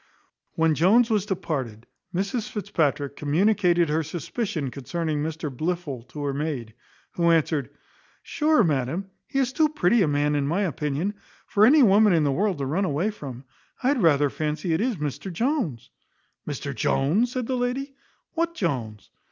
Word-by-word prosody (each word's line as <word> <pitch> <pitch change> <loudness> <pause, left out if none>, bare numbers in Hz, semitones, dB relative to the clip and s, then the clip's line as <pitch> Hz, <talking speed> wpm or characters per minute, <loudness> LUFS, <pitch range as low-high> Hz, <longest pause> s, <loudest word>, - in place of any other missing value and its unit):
When 160 -1 +3
Jones 220 - +4
was 210 -2 +1
departed 135 - -3 0.3
Mrs 200 +5 -2
Fitzpatrick 150 -8 -1
communicated 175 +2 +2
her 155 +2 +1
suspicion 160 - -3
concerning 155 +3 -3
Mr 155 -2 -4
Blifil 155 -6 -3
to 145 +4 -7
her 140 -1 -1
maid; 140 -6 -3 0.4
who 170 -1 +1
answered, 155 -4 +2 0.5
"Sure, 310 -5 +2
madam, 160 +5 -1 0.2
he 275 - -4
is 265 -1 +1
too 310 +1 +3
pretty 235 -7 +2
a 175 - +3
man, 145 0 +1
in 145 -1 0
my 170 +7 0
opinion, 155 +3 -2 0.3
for 210 +2 +4
any 290 +2 +6
woman 210 -1 +5
in 160 -2 +3
the 145 - +2
world 195 +4 0
to 140 - -2
run 160 +9 0
away 175 +6 0
from. 135 - -8 0.4
I 255 - +3
had 280 -4 +1
rather 145 -4 +4
fancy 155 +3 -2
it 160 - +1
is 245 0 0
Mr 150 +3 -4
Jones." 225 - -2 0.6
"Mr - - -4
Jones!" 195 - +1
said 255 -2 -2
the 260 - -2
lady, 255 +3 -2 0.4
"what 335 0 -1
Jones?" 120 - -3
165 Hz, 165 wpm, -25 LUFS, 145-210 Hz, 0.6 s, any